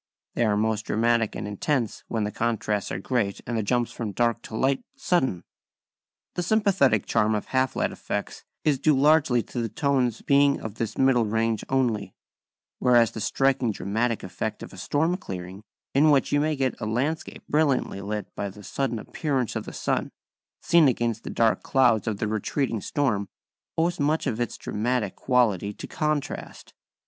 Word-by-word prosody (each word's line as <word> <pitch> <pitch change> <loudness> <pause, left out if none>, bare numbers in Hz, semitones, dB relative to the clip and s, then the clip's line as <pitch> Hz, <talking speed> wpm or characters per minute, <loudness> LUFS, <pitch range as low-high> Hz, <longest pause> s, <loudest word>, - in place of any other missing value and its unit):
# - - -66
#They 120 - +1
are 105 -1 +2
most 110 0 0
dramatic 115 0 +1
and - - -4
intense 115 +3 -1
when 110 -2 -1
the 105 - -2
contrasts 110 -3 -1
are - - -2
great 100 -1 -1
and 120 - -3
the 110 - +1
jumps 120 +3 0
from 110 -4 -5
dark 120 +2 +1
to 110 - -6
light 135 +3 +1
sudden.# 130 - 0 0.9
The - - -2
sympathetic 185 - +3
charm 110 +1 +2
of 105 - -2
half 130 0 +1
light - - 0
effects - - -5 0.2
is 145 -4 +2
due 150 0 +3
largely 140 -4 +4
to 120 - -4
the 115 - -2
tones 130 -3 0
being 140 0 +4
of 110 -1 -7
this 115 - -3
middle 125 -4 +3
range 115 0 0
only; 125 -6 0 0.6
whereas 120 -3 +4
the 110 - -6
striking 135 0 +1
dramatic 110 +4 -1
effect 90 -1 -4
of - - -10
a - - -11
storm 160 +5 0
clearing, 95 - -7 0.3
in 150 +3 +5
which 140 -3 +3
you 145 - +3
may 155 +1 +1
get 130 -3 -1
a 110 - -2
landscape 135 +9 -2
brilliantly 140 -9 +1
lit 105 +1 -4
by 100 - -3
the 105 +2 -13
sudden 130 +4 -2
appearance 130 0 -2
of - - -3
the - - -7
sun, - - -1 0.5
seen 170 -3 +5
against 120 -3 0
the - - -6
dark 115 -1 +2
clouds 120 -4 +3
of 110 -2 -1
the 110 - -1
retreating 110 +2 -1
storm, 110 -8 0 0.5
owes 170 +2 +1
much 150 +3 +1
of 120 -4 -1
its 120 - -2
dramatic 110 -1 -1
quality 110 -6 +2
to - - -8
contrast. 150 -2 -3
120 Hz, 180 wpm, -26 LUFS, 110-140 Hz, 0.9 s, in